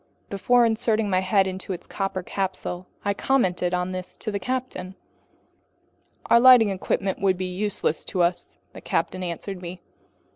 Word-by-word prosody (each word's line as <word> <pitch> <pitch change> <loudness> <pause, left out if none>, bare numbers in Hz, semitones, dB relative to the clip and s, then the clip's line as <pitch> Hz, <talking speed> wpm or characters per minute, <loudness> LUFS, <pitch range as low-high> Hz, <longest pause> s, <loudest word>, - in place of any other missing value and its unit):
Before 240 +5 +3
inserting 220 -2 +1
my 185 - +3
head 190 +1 +3
into 190 0 -4
its 175 - -8
copper 195 -2 -3
capsule, 185 -1 -4 0.2
I 200 - +2
commented 185 -7 +1
on 180 0 -1
this 185 -1 -6
to 215 - -4
the 200 - -2
captain. 245 -6 -4 1.3
"Our 235 - +5
lighting 250 -3 +8
equipment 190 0 -1
would 190 -2 +2
be 185 - -2
useless 185 -3 -1
to 180 - 0
us," 175 +1 -1 0.2
the - - -10
captain 185 - -1
answered 180 +2 -5
me. 175 +1 -7
190 Hz, 155 wpm, -24 LUFS, 180-215 Hz, 1.3 s, lighting